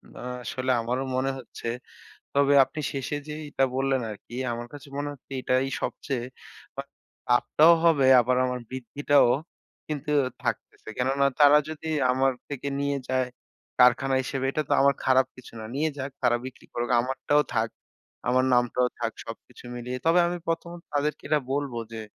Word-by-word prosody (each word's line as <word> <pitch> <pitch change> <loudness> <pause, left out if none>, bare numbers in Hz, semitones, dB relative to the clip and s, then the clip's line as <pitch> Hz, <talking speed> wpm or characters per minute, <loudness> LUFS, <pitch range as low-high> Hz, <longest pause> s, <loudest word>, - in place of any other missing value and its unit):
না, - - -10 0.2
আসলে 130 +2 -2
আমারও 125 +3 -2
মনে 130 +1 +1
হচ্ছে। 120 -1 -9 0.7
তবে 140 0 +3
আপনি 155 - -7
শেষে 140 +1 -3
যেইটা 150 -3 -1
বললেন 135 0 +1
আরকি, 105 +2 -11 0.2
আমার 120 0 -5
কাছে 145 -1 -11
মনে 145 0 -2
হচ্ছে 140 -1 -17
এটাই 130 +1 +1 0.2
সবচেয়ে 130 -5 -3 0.6
আ - - -5 0.5
লাভটাও 150 +7 +5
হবে 155 -5 +5
আবার 125 +1 +1
আমার 125 0 -2
বৃদ্ধিটাও 130 +2 +2 0.6
কিন্তু 150 0 -4 0.3
থাকতেছে। - - -4
কেননা 135 +2 +2
তারা 145 0 +8
যদি 160 0 -7 0.2
আমার 135 +1 +2 0.2
থেকে 140 -1 -4
নিয়ে 140 0 0
যায় 130 -1 +1 0.5
কারখানা 125 +2 +5
হিসেবে 135 0 -2
এটা 155 - -1
তো - - -1
আমার 140 0 +5
খারাপ 130 0 +4
কিছু 130 - -13
না। - - -7
নিয়ে 155 +3 +1
যাক 135 +1 -4
তারা 120 -1 +4
বিক্রি 130 -1 -10
করুক। 120 +1 -3
আমারটাও 135 +4 +1
থাক। 110 +1 +1 0.6
আমার 130 +1 +3
নামটাও 125 +1 +2
থাক 115 -1 -1
সবকিছু 115 +2 -11
মিলিয়ে। 125 +1 -5
তবে 165 +2 +5
আমি 175 +1 -2
১ম 165 +1 -2 0.2
তাদেরকে 145 +1 -1
এটা 150 0 +3
বলবো 140 -4 -2
যে 115 - -5
135 Hz, 160 wpm, -26 LUFS, 125-145 Hz, 0.7 s, তারা